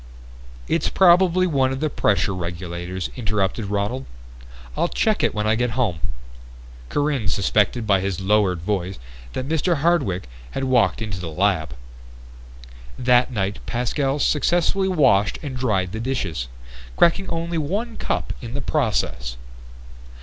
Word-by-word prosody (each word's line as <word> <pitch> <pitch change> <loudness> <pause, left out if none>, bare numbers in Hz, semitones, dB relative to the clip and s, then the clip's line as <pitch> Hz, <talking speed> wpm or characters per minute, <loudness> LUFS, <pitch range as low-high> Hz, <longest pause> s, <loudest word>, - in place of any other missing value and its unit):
"It's - - +1
probably 185 0 +5
one 135 -6 +2
of 130 - -3
the 155 - +1
pressure 105 -8 +1
regulators," 85 0 -4
interrupted 105 -2 -1
Ronald. 105 +6 -2 0.7
"I'll - - +1
check 60 +1 +1
it - - +1
when 105 0 0
I 110 - +3
get 120 +1 -1
home." 105 -11 +1 0.9
Corinne 145 -7 0
suspected 105 +4 +1
by 100 -3 +3
his 95 -1 -2
lowered 95 -3 +2
voice 95 0 -2 0.4
that 130 - -3
Mr. 160 +3 +1
Hardwick 140 - +1 0.3
had 135 - -1
walked 125 -3 +2
into 105 -4 -4
the 90 -2 -5
lab. 80 -4 0 1.2
That 125 0 +3
night 100 -3 -2
Pascal 135 +3 0
successfully 175 +7 +2
washed 105 - +3
and 140 -3 -5
dried 100 -8 0
the 110 - -4
dishes, 115 - -2 0.5
cracking 190 +3 +3
only 165 0 -2
one 205 +10 -2
cup - - -2
in 120 0 -6
the - - -2
process. 100 - -1
115 Hz, 135 wpm, -22 LUFS, 95-145 Hz, 1.2 s, probably